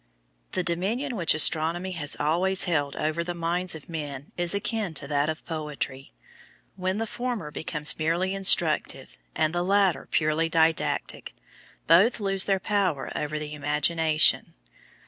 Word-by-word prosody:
The 185 - 0
dominion 210 +11 -1
which 170 -7 +2
astronomy 165 +4 +2
has 150 -4 0
always 180 +5 +2
held 145 -5 -1
over 155 +2 -1
the 175 +1 -5
minds 175 +1 -1
of 155 - -11
men 145 -4 -6
is 175 +2 0
akin 200 -4 -2
to 140 - -6
that 145 +1 0
of 155 - -5
poetry; 150 -4 -5 0.6
when 185 +1 -2
the 225 - -1
former 235 -9 -4
becomes 150 0 -1
merely 170 +4 0
instructive 195 - +1 0.2
and 155 +1 +1
the 175 - 0
latter 195 -1 +2
purely 155 +1 +1
didactic, 160 0 0 0.5
both 195 +10 +5
lose 195 -2 +1
their 195 -1 +1
power 185 -8 -1
over 150 +1 -3
the 150 0 -6
imagination. 150 +2 +2
165 Hz, 145 wpm, -26 LUFS, 155-190 Hz, 0.6 s, both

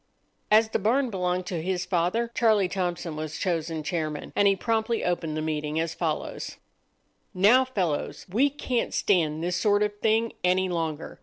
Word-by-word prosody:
As 220 +1 +5
the - - 0
barn 240 +5 +1
belonged 180 -1 -1
to 175 -3 -3
his 180 +1 -2
father, 185 +7 0
Charlie 215 -5 +3
Thompson 175 -3 -3
was 155 0 -5
chosen 165 -3 -2
chairman, 155 -4 -3
and 205 - +4
he 195 - +4
promptly 225 +2 -1
opened 165 -3 -1
the 155 - -2
meeting 155 0 -2
as 165 0 -1
follows:— - - -3 0.8
"Now, 215 +8 +6
fellows, 185 - -2
we 240 +10 +2
can't 255 -4 -2
stand 160 -5 +1
this 175 0 -1
sort 205 +2 +3
of 205 0 -3
thing 225 +1 +1
any 185 +1 +2
longer. 165 -3 -3
180 Hz, 165 wpm, -26 LUFS, 165-215 Hz, 0.8 s, Now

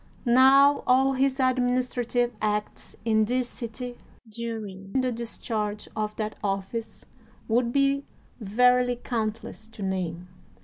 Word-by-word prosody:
Now 270 +3 +6
all 265 +2 +4
his 270 +1 +1
administrative 245 -1 +1
acts 210 0 -2
in 220 -1 +3
this 250 +2 0
city 245 +1 -7 0.3
during 215 -4 -6
the 255 -1 +1
discharge 220 -2 -4
of 215 -1 -2
that 215 -1 -3
office 195 +3 -3 0.4
would 235 +1 +1
be 275 +1 +2 0.4
verily 250 +3 +3
countless 225 -2 -4
to 225 -2 -9
name. 180 -2 -3
235 Hz, 115 wpm, -26 LUFS, 215-255 Hz, 0.4 s, Now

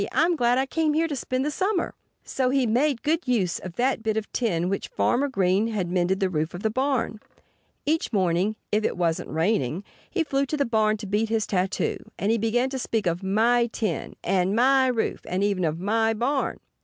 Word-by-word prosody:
I'm 340 +2 +3
glad 245 -3 +2
I 265 - +2
came 310 +2 0
here 325 +1 +2
to 300 - -3
spend 255 +1 -2
the 300 - 0
summer." 375 +3 -1 0.3
So 260 -1 0
he 265 -1 +2
made 245 +3 +1
good 320 +1 0
use 205 -9 +1
of 185 - -8
that 255 -1 +1
bit 220 -1 -1
of 220 - -3
tin 190 -9 0
with 180 - -1
which - - -9
Farmer 265 +4 +1
Green 195 -4 +1
had 200 -6 -2
mended 185 +1 +1
the 190 - +2
roof 160 -1 -2
of 175 - -7
the 220 - +1
barn. 260 -3 -1 0.7
Each 320 +2 0
morning 190 0 +1 0.2
(if 215 +1 +1
it - - -1
wasn't 170 -2 0
raining) 165 - 0 0.3
he 350 - 0
flew 275 -2 0
to 305 - -2
the 280 - +1
barn 215 -2 +2
to 210 - -7
beat 210 +3 0
his 225 -1 +1
tattoo. 185 -1 -1 0.2
And 200 +3 0
he 230 - +2
began 240 +4 +1
to 265 - -3
speak 225 -3 -1
of 170 +1 0
"My 230 +5 +3
tin," 215 -6 -3
and 190 +1 +1
"My 260 +2 +4
roof"—and 220 -5 -1
even 200 -3 +1
of 160 0 -1
"My 225 +4 +1
barn!" 265 +5 -1
225 Hz, 215 wpm, -25 LUFS, 190-265 Hz, 0.7 s, My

